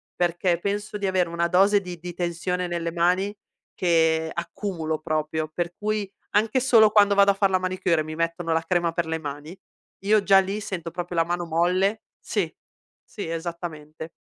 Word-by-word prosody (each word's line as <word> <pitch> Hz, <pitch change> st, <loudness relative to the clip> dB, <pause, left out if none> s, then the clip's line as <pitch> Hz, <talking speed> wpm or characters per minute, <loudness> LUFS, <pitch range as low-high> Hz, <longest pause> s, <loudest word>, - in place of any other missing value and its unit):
perché 175 Hz, 0 st, +1 dB
penso 205 Hz, +2 st, -3 dB
di 200 Hz, -, -1 dB
avere 185 Hz, -2 st, +1 dB
una 170 Hz, 0 st, 0 dB
dose 195 Hz, +4 st, +4 dB
di 180 Hz, -2 st, -7 dB
di 175 Hz, +1 st, -7 dB
tensione 180 Hz, +1 st, -2 dB
nelle 170 Hz, -1 st, -3 dB
mani 180 Hz, +4 st, +1 dB, 0.4 s
che 160 Hz, -2 st, +2 dB
accumulo 170 Hz, -3 st, -3 dB
proprio, 155 Hz, 0 st, -2 dB
per 175 Hz, +1 st, -2 dB
cui 210 Hz, -1 st, -2 dB, 0.3 s
anche 220 Hz, +4 st, +3 dB
solo 230 Hz, -4 st, +5 dB
quando 205 Hz, -1 st, +5 dB
vado 200 Hz, 0 st, +6 dB
a -, -, 0 dB
far 195 Hz, 0 st, +2 dB
la 190 Hz, -, +3 dB
manicure 185 Hz, -2 st, 0 dB
e -, -, -3 dB
mi 155 Hz, +1 st, -7 dB
mettono 165 Hz, 0 st, -1 dB
la 165 Hz, -, +2 dB
crema 175 Hz, -1 st, +1 dB
per 170 Hz, 0 st, -1 dB
le 160 Hz, 0 st, -2 dB
mani, 150 Hz, +3 st, -7 dB, 0.5 s
io, 210 Hz, 0 st, +4 dB
già 195 Hz, -1 st, +6 dB
lì, 195 Hz, +2 st, -2 dB
sento 185 Hz, -5 st, -5 dB
proprio 175 Hz, 0 st, -5 dB
la 165 Hz, -, +4 dB
mano 175 Hz, +1 st, -2 dB
molle 180 Hz, +6 st, +1 dB, 0.2 s
sì, -, -, -2 dB, 0.5 s
sì 200 Hz, -, -7 dB
esattamente. 165 Hz, -2 st, -6 dB
175 Hz, 180 wpm, -24 LUFS, 165-195 Hz, 0.5 s, vado